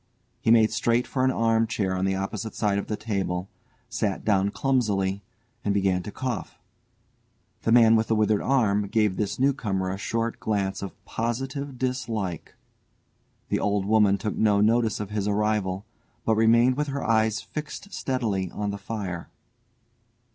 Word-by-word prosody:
He - - -1
made 110 -1 +6
straight 115 +2 +1
for 130 - -1
an 130 - +4
arm 115 -2 +2
chair 100 -4 -1
on 95 +1 0
the 95 0 +1
opposite 100 +3 -4
side 100 -2 +1
of - - -5
the 105 - -1
table, 95 -4 -2 0.4
sat 105 -4 -2
down 100 -2 +3
clumsily, 100 -7 0 0.4
and 100 -1 0
began 95 -2 +2
to 105 - -7
cough. 125 0 -4 1.0
The 115 - 0
man 115 -1 +7
with 110 0 +2
the 110 - +2
withered 105 -1 +2
arm 105 -7 +2
gave 105 -2 +1
this 100 -1 -2
new 140 +2 +3
comer 95 -7 -2
a 95 - -5
short 115 +3 -2
glance 100 -3 -1
of 100 - -7
positive 135 +4 -3
dislike; 115 - -3 0.9
the - - +1
old 100 -1 0
woman 105 -1 +4
took 105 - -3
no 105 -2 +3
notice 110 +1 +2
of 105 -1 -5
his 105 -1 -1
arrival, 105 -2 0 0.4
but 110 - +3
remained 115 +3 +4
with 150 0 0
her 140 0 -3
eyes 110 -1 +2
fixed 155 +6 -7
steadily 110 -8 -1
on 105 +2 -3
the 100 - -6
fire. 95 -7 -5
110 Hz, 165 wpm, -26 LUFS, 100-115 Hz, 1.0 s, man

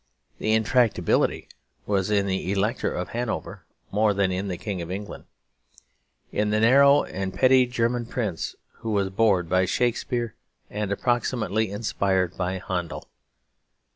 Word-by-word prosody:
The 110 - +1
intractability 110 +1 +2 0.4
was 100 -1 0
in 100 -2 +2
the 95 -1 -2
Elector 105 +5 0
of - - -4
Hanover 120 0 -4 0.3
more 105 0 +2
than 95 -1 +2
in 95 +2 -2
the 90 -2 -3
King 100 -3 -4
of 85 - -6
England; 100 +3 -6 1.1
in 105 0 0
the 105 +1 +2
narrow 140 +5 +6
and 95 0 -4
petty 130 +3 +4
German 120 -1 -1
prince 105 -9 -3 0.2
who 115 - -6
was 100 -2 0
bored 95 -4 +2
by 95 +2 +2
Shakespeare 120 +2 -1 0.4
and 105 -1 -3
approximately 110 -2 0
inspired 95 -3 0
by 95 +1 -2
Handel. 90 -3 -4
105 Hz, 140 wpm, -25 LUFS, 95-115 Hz, 1.1 s, narrow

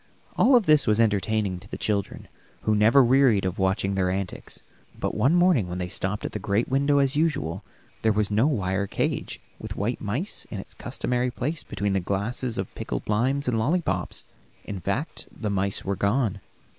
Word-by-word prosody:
All 255 -1 +6
this 155 - +3
was 105 0 +3
entertaining 105 -3 +1
to 100 +2 -15
the - - -5
children, 100 -3 -2 0.3
who 110 - +1
never 110 +6 +6
wearied 125 -5 +4
watching 95 0 0
their 95 -1 +1
antics. 95 0 -5 0.4
But - - -1
one 130 +10 +3
morning 175 - +3
when 90 - -4
they 90 -1 -3
stopped 100 +3 -2
at - - -3
the 105 - -4
great 100 +3 0
window, 140 +2 +2
as 140 0 +3
usual, 130 - 0 0.4
there 110 - +3
was 105 -1 0
no 110 +7 +3
wire 100 -7 0
cage - - -2 0.2
with - - -6
white 110 +5 -2
mice 125 - -3
in 105 - -5
its - - -9
customary 125 0 -2
place 145 +6 -3
between 100 -1 -2
the 95 - +2
glasses 110 +6 -2
of 95 -1 -4
pickled - - -5
limes 130 +7 +1
and 115 -3 +1
lollipops; 160 +10 -1 0.4
in 100 -2 -5
fact, - - -3
the 105 - -4
mice 100 0 -1
were 100 +1 0
gone. 100 0 0
105 Hz, 180 wpm, -25 LUFS, 100-130 Hz, 0.4 s, All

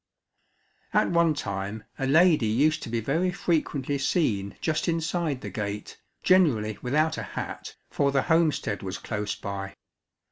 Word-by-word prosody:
At - - +3
one 170 -2 +3
time 100 -3 -4 0.2
a 135 - 0
lady 155 -4 +5
used 150 +8 +2
to - - -6
be 115 0 -1
very 165 +10 +1
frequently 145 -6 -1
seen 110 - 0
just 155 +2 -1
inside 165 -4 -1
the - - -6
gate, 105 -2 -5 0.2
generally 120 - +3
without 155 +5 +1
a - - -7
hat, - - -5 0.2
for 140 -1 +2
the 135 -1 +2
homestead 160 -10 +1
was 95 -1 -4
close 105 -1 -3
by. 100 0 -6
140 Hz, 145 wpm, -26 LUFS, 105-160 Hz, 0.2 s, lady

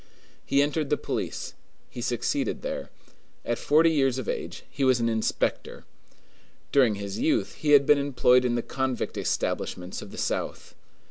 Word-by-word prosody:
He 140 +1 +3
entered 150 0 -1
the 150 - +2
police; - - -4 0.4
he 120 - -6
succeeded 125 - -1
there. - - -4 0.6
At - - -1
forty 160 +2 +4
years 135 -4 +2
of 130 - -4
age - - -4
he 140 - -4
was 130 -2 +4
an 115 - +1
inspector. 110 -1 -1 0.9
During 125 -7 +4
his 100 0 -5
youth 160 - +1
he 150 -1 +1
had 140 -1 +7
been 145 0 +5
employed 125 -2 +3
in 120 -1 +1
the 120 - -1
convict 130 -2 -2
establishments 90 0 -2
of - - -9
the - - -11
South. - - -3
135 Hz, 160 wpm, -26 LUFS, 120-145 Hz, 0.9 s, had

